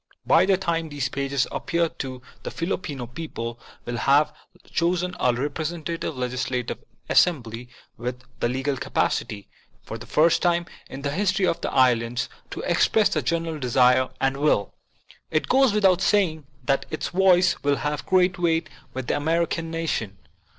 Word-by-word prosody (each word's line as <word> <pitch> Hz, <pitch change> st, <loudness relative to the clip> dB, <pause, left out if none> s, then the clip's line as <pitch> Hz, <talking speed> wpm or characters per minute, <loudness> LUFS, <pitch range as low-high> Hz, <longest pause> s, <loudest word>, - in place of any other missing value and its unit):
By 185 Hz, -, +5 dB
the 195 Hz, -1 st, +4 dB
time 165 Hz, -3 st, -1 dB
these 140 Hz, -3 st, -2 dB
pages 140 Hz, 0 st, 0 dB
appear 170 Hz, 0 st, 0 dB
the 130 Hz, -1 st, -7 dB
Filipino 155 Hz, -7 st, -3 dB
people 120 Hz, -3 st, -6 dB, 0.3 s
will 120 Hz, 0 st, -3 dB
have 140 Hz, +4 st, +3 dB, 0.3 s
chosen 180 Hz, +1 st, 0 dB
a 125 Hz, -, +3 dB
representative 155 Hz, +4 st, -3 dB
legislative 125 Hz, 0 st, -2 dB, 0.3 s
assembly 120 Hz, -8 st, +2 dB, 0.3 s
with 125 Hz, +1 st, -5 dB, 0.2 s
the 120 Hz, -, +1 dB
legal 135 Hz, +2 st, -1 dB
capacity, 100 Hz, -3 st, -1 dB, 0.4 s
for -, -, -7 dB
the -, -, -10 dB
first 160 Hz, +2 st, +3 dB
time 175 Hz, -1 st, +2 dB, 0.2 s
in 135 Hz, +1 st, -8 dB
the 140 Hz, -, -1 dB
history 190 Hz, +3 st, +1 dB
of 165 Hz, -, 0 dB
the -, -, -2 dB
islands, 120 Hz, -1 st, +2 dB, 0.2 s
to -, -, -5 dB
express 220 Hz, -2 st, +3 dB
the -, -, 0 dB
general 165 Hz, -2 st, -2 dB
desire 125 Hz, 0 st, +3 dB
and 135 Hz, 0 st, +1 dB
will. 140 Hz, -9 st, +1 dB, 0.6 s
It 155 Hz, -, 0 dB
goes 265 Hz, -2 st, +4 dB
without 190 Hz, -3 st, +3 dB
saying 165 Hz, -9 st, +2 dB, 0.2 s
that 135 Hz, -1 st, 0 dB
its 155 Hz, -, -3 dB
voice 185 Hz, 0 st, +4 dB
will 145 Hz, 0 st, +2 dB
have 150 Hz, 0 st, -2 dB
great 180 Hz, -1 st, +3 dB
weight 165 Hz, -2 st, +1 dB, 0.2 s
with 130 Hz, -1 st, -3 dB
the -, -, 0 dB
American 165 Hz, +2 st, 0 dB
nation. 160 Hz, -, -2 dB
150 Hz, 150 wpm, -24 LUFS, 130-170 Hz, 0.6 s, By